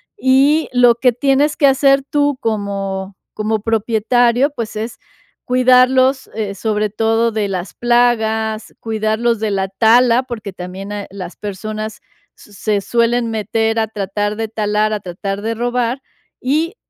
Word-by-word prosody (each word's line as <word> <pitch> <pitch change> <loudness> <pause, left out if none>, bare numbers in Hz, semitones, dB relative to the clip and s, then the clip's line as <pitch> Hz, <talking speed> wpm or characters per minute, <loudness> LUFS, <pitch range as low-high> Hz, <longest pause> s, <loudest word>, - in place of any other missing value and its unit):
y 285 0 +3
lo 245 -1 +5
que 250 0 +2
tienes 280 +4 +1
que 285 - +3
hacer 275 0 +4
tú 290 -2 +1
como 195 -3 -3 0.2
como 215 0 -1
propietario, 235 +4 +2
pues, 225 -2 -5
es 225 +2 -5 0.5
cuidarlos, 255 +1 +3
eh, 205 -3 -3
sobre 210 0 -1
todo 225 +2 +1
de 210 -2 -1
las 185 -1 -4
plagas, 220 -2 +1
cuidarlos 220 +1 0
de 220 -1 -1
la 190 -1 -1
tala, 235 +4 +4
porque 225 -5 -7
también, 185 +3 -7
eh, 205 -1 -5
las 185 -3 -8
personas 215 +1 -6 0.3
s 210 - -18
se 205 +1 -1
suelen 235 +1 +1
meter 225 +1 0
a 220 - 0
tratar 205 0 -3
de 225 0 -3
talar, 215 -1 0
a 210 - -1
tratar 195 +2 -5
de 225 +1 -2
robar, 245 +2 -1 0.4
y 315 - 0
225 Hz, 145 wpm, -17 LUFS, 210-245 Hz, 0.5 s, lo